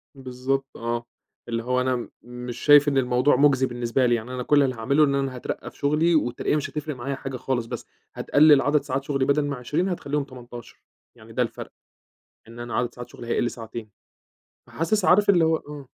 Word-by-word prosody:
بالضبط 135 Hz, +1 st, -2 dB
آه، 120 Hz, 0 st, -3 dB, 0.4 s
اللي 115 Hz, 0 st, -2 dB
هو 125 Hz, +1 st, 0 dB
أنا 125 Hz, -2 st, -1 dB
مش 125 Hz, 0 st, -8 dB
شايف 145 Hz, 0 st, +6 dB
إن 140 Hz, -, +2 dB
الموضوع 125 Hz, +2 st, +3 dB
مُجزي 135 Hz, -1 st, +4 dB
بالنسبة 120 Hz, +1 st, 0 dB
لي، 120 Hz, -1 st, +3 dB
يعني 115 Hz, +2 st, -5 dB
أنا 125 Hz, -1 st, -3 dB
كلّ 145 Hz, +1 st, +4 dB
اللي 130 Hz, -2 st, -1 dB
هاعمله 140 Hz, +7 st, +2 dB
إن 140 Hz, -1 st, +2 dB
أنا 135 Hz, -2 st, -1 dB
هاترقّى 125 Hz, -, -6 dB
في -, -, -22 dB
شُغلي، 155 Hz, +4 st, +2 dB
والترقية 125 Hz, 0 st, 0 dB
مش 150 Hz, -, -2 dB
هتفرِق 150 Hz, -1 st, -5 dB
معايا 135 Hz, +3 st, -4 dB
حاجة 130 Hz, -1 st, -6 dB
خالص، 125 Hz, -2 st, -2 dB
بس -, -, -6 dB, 0.3 s
هتقلِّل 145 Hz, -1 st, +5 dB
عدَد 145 Hz, +1 st, +2 dB
ساعات 135 Hz, +1 st, -2 dB
شُغلي 135 Hz, -2 st, 0 dB
بدَل 145 Hz, +1 st, +2 dB
ما 145 Hz, -, -2 dB
20 150 Hz, +9 st, -1 dB
هتخليهم 150 Hz, -5 st, -2 dB
18 120 Hz, -3 st, -12 dB, 0.3 s
يعني -, -, -15 dB
ده -, -, 0 dB
الفرْق، -, -, -7 dB, 0.8 s
إن 115 Hz, +1 st, -12 dB
أنا 120 Hz, 0 st, -5 dB
عدَد 120 Hz, -1 st, -1 dB
ساعات 120 Hz, 0 st, -9 dB
شُغلي 120 Hz, -, -11 dB
هيقِل 120 Hz, 0 st, 0 dB
ساعتين، 115 Hz, -1 st, -8 dB, 0.8 s
فحاسس، 185 Hz, +5 st, -1 dB
عارف 200 Hz, +3 st, +4 dB
اللي 175 Hz, -4 st, +5 dB
هو 160 Hz, 0 st, +2 dB
إمم. 145 Hz, -1 st, -10 dB
130 Hz, 200 wpm, -24 LUFS, 120-145 Hz, 0.8 s, شايف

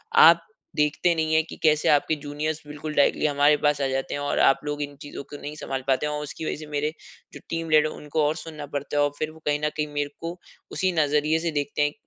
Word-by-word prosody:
"आप 465 Hz, 0 st, +8 dB, 0.3 s
देखते 150 Hz, +3 st, +2 dB
नहीं 160 Hz, -1 st, 0 dB
है 160 Hz, -, +5 dB
कि 160 Hz, -, -10 dB
कैसे 155 Hz, -1 st, +4 dB
आपके 150 Hz, +1 st, +3 dB
जूनियर्स 150 Hz, +1 st, -4 dB
बिल्कुल 150 Hz, +1 st, -6 dB
डायरेक्टली 145 Hz, -, +3 dB
हमारे 145 Hz, 0 st, +4 dB
पास 145 Hz, -1 st, +3 dB
आ 135 Hz, -, +2 dB
जाते 135 Hz, 0 st, -2 dB
हैं 145 Hz, -, -3 dB
और 145 Hz, 0 st, 0 dB
आप 135 Hz, -, +5 dB
लोग 145 Hz, 0 st, -3 dB
इन 145 Hz, 0 st, -4 dB
चीज़ों 145 Hz, -1 st, -7 dB
को -, -, -5 dB
नहीं 150 Hz, +1 st, -6 dB
सँभाल 135 Hz, -3 st, -4 dB
पाते 135 Hz, +2 st, +2 dB
हैं 150 Hz, -, -1 dB
और 150 Hz, 0 st, -3 dB
उसकी 150 Hz, +2 st, -6 dB
वजह -, -, -1 dB
से 155 Hz, 0 st, -9 dB
मेरे 150 Hz, +1 st, -1 dB, 0.4 s
जो -, -, -9 dB
टीम 165 Hz, 0 st, -3 dB
लीडर 155 Hz, 0 st, +5 dB
उनको 150 Hz, +1 st, -2 dB
और 150 Hz, -, 0 dB
सुनना 155 Hz, -3 st, -7 dB
पड़ता 145 Hz, +1 st, -3 dB
है 145 Hz, -, +5 dB
और 145 Hz, -, +1 dB
फिर 155 Hz, 0 st, -2 dB
वो 160 Hz, -, -15 dB
कहीं 145 Hz, 0 st, +1 dB
न -, -, +2 dB
कहीं 150 Hz, 0 st, 0 dB
मेरे 145 Hz, 0 st, -1 dB
को 170 Hz, +2 st, -6 dB, 0.3 s
उसी 185 Hz, 0 st, +1 dB
नज़रिए 150 Hz, +2 st, +2 dB
से 165 Hz, 0 st, -1 dB
देखते 145 Hz, -1 st, -2 dB
हैं। 145 Hz, 0 st, +2 dB
150 Hz, 255 wpm, -25 LUFS, 145-155 Hz, 0.4 s, आप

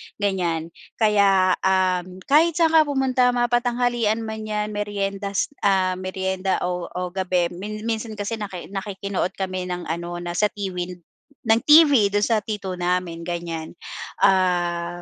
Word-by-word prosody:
ganiyan. 175 Hz, -5 st, -1 dB, 0.2 s
Kaya 200 Hz, -4 st, +4 dB
uhm, 185 Hz, -1 st, 0 dB
kahit 310 Hz, -, +4 dB
saan 330 Hz, -1 st, +3 dB
ka 315 Hz, -2 st, +5 dB
pumunta 265 Hz, -3 st, +2 dB
mapa-tanghalian 240 Hz, -2 st, +1 dB
man 220 Hz, -1 st, -5 dB
'yan 210 Hz, 0 st, -2 dB
meriendas 200 Hz, 0 st, -2 dB
ah, 185 Hz, -2 st, +2 dB
merienda, 190 Hz, 0 st, -2 dB
o 180 Hz, -1 st, -2 dB
o 180 Hz, 0 st, -5 dB
gabi, 180 Hz, -2 st, 0 dB
mi 210 Hz, +4 st, -6 dB
minsan 225 Hz, -1 st, -3 dB
kasi 210 Hz, +2 st, -4 dB
naki 195 Hz, -3 st, -7 dB
nakikinood 195 Hz, -1 st, -3 dB
kami 185 Hz, -1 st, -3 dB
ng 180 Hz, -1 st, -4 dB
ano, 170 Hz, +1 st, -4 dB
na 175 Hz, -, -4 dB
sa 210 Hz, +4 st, +2 dB
Tiwind 180 Hz, -3 st, -5 dB, 0.4 s
ng 225 Hz, 0 st, +3 dB
TV 290 Hz, -9 st, +7 dB
do'n 205 Hz, 0 st, +2 dB
sa 225 Hz, +1 st, +2 dB
tito 205 Hz, -2 st, -5 dB
namin, 175 Hz, -1 st, -1 dB
ganiyan. 170 Hz, -2 st, -4 dB, 0.5 s
Ah, 175 Hz, -2 st, +2 dB
195 Hz, 140 wpm, -23 LUFS, 180-215 Hz, 0.5 s, TV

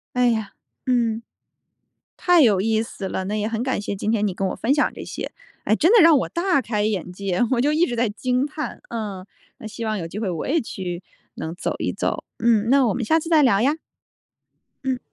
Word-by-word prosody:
哎 250 Hz, 0 st, +4 dB
呀， 220 Hz, -4 st, -1 dB, 0.3 s
嗯， 230 Hz, -3 st, +1 dB, 1.0 s
太 355 Hz, -2 st, +4 dB
有 210 Hz, -8 st, +5 dB
意 220 Hz, +2 st, +1 dB
思 195 Hz, -3 st, -6 dB
了。 190 Hz, -, -3 dB
那 210 Hz, +2 st, -2 dB
也 210 Hz, -, -1 dB
很 225 Hz, +1 st, -2 dB
感 260 Hz, -5 st, -1 dB
谢 205 Hz, -, -3 dB
今 210 Hz, +3 st, -1 dB
天 210 Hz, -2 st, +1 dB
你 190 Hz, -, -2 dB
跟 195 Hz, +1 st, -1 dB
我 -, -, -4 dB
分 260 Hz, +5 st, +1 dB
享 295 Hz, -, +2 dB
这 -, -, -8 dB
些， -, -, -6 dB, 0.3 s
哎， 215 Hz, -, +2 dB
真 330 Hz, -, +3 dB
的 455 Hz, -, +8 dB
让 325 Hz, -2 st, +7 dB
我 -, -, -1 dB
大 345 Hz, -4 st, +1 dB
开 210 Hz, -2 st, -1 dB
眼 195 Hz, -4 st, -1 dB
界， 190 Hz, -1 st, -2 dB
我 245 Hz, -2 st, +2 dB
就 295 Hz, +2 st, +2 dB
一 325 Hz, +3 st, +3 dB
直 240 Hz, -, -3 dB
在 230 Hz, -2 st, +1 dB
惊 250 Hz, +5 st, 0 dB
叹， 305 Hz, 0 st, -6 dB
嗯， 205 Hz, -5 st, -5 dB, 0.3 s
那 220 Hz, -, -7 dB
希 225 Hz, +1 st, -6 dB
望 215 Hz, -1 st, -1 dB
有 165 Hz, -3 st, -4 dB
机 200 Hz, +5 st, -6 dB
会 210 Hz, -, -1 dB
我 170 Hz, -3 st, -3 dB
也 320 Hz, +4 st, +2 dB
去 180 Hz, -7 st, -5 dB, 0.3 s
能 160 Hz, +2 st, -5 dB
走 -, -, -2 dB
一 -, -, -1 dB
走。 -, -, -2 dB
嗯， 225 Hz, -1 st, +3 dB
那 270 Hz, -1 st, +5 dB
我 205 Hz, -, +1 dB
们 245 Hz, -, -2 dB
下 320 Hz, -, +3 dB
次 325 Hz, -, -7 dB
再 320 Hz, -2 st, +5 dB
聊 215 Hz, -5 st, +4 dB
呀。 285 Hz, +5 st, +2 dB, 1.1 s
嗯。 260 Hz, -1 st, 0 dB
225 Hz, 245 characters per minute, -23 LUFS, 205-265 Hz, 1.1 s, 的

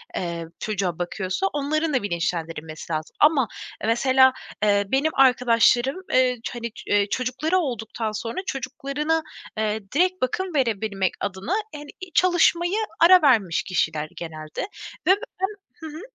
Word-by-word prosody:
eee, 170 Hz, -2 st, -3 dB
çocuğa 190 Hz, -5 st, -2 dB
bakıyorsa 185 Hz, -, -2 dB
onların 305 Hz, +2 st, 0 dB
da 255 Hz, -, +1 dB
bilinçlendirilmesi 165 Hz, -3 st, -3 dB
lazım. 155 Hz, 0 st, -4 dB
Ama 295 Hz, -6 st, +4 dB, 0.3 s
e, -, -, -2 dB
mesela, 260 Hz, +3 st, +4 dB, 0.3 s
eee, 200 Hz, -1 st, +3 dB
benim 285 Hz, +4 st, +2 dB
arkadaşlarım, 250 Hz, +2 st, +4 dB, 0.2 s
eee, 255 Hz, -1 st, +3 dB
ç 250 Hz, -, -5 dB
hani, 235 Hz, -1 st, -4 dB, 0.2 s
eee, 205 Hz, 0 st, +3 dB
çocukları 260 Hz, +8 st, 0 dB
olduktan 230 Hz, -, -2 dB
sonra 230 Hz, +2 st, -5 dB
çocuklarına, 275 Hz, +4 st, -2 dB, 0.3 s
eee, 215 Hz, 0 st, 0 dB
direkt 365 Hz, +6 st, +1 dB
bakım 350 Hz, +7 st, -1 dB
verebilmek 215 Hz, -7 st, 0 dB
adına 195 Hz, -, -3 dB, 0.2 s
hani 295 Hz, 0 st, -9 dB
i 370 Hz, -2 st, -8 dB
çalışmaya 350 Hz, +2 st, +3 dB, 0.2 s
ara 360 Hz, +1 st, +8 dB
vermiş 220 Hz, -, +3 dB
kişiler 155 Hz, -4 st, -1 dB
genelde 155 Hz, -2 st, -6 dB, 0.5 s
ve -, -, +7 dB, 0.3 s
ben 385 Hz, -, +3 dB, 0.3 s
Hı 320 Hz, -, -9 dB
hı. 310 Hz, +3 st, -8 dB
250 Hz, 140 wpm, -24 LUFS, 195-300 Hz, 0.5 s, ara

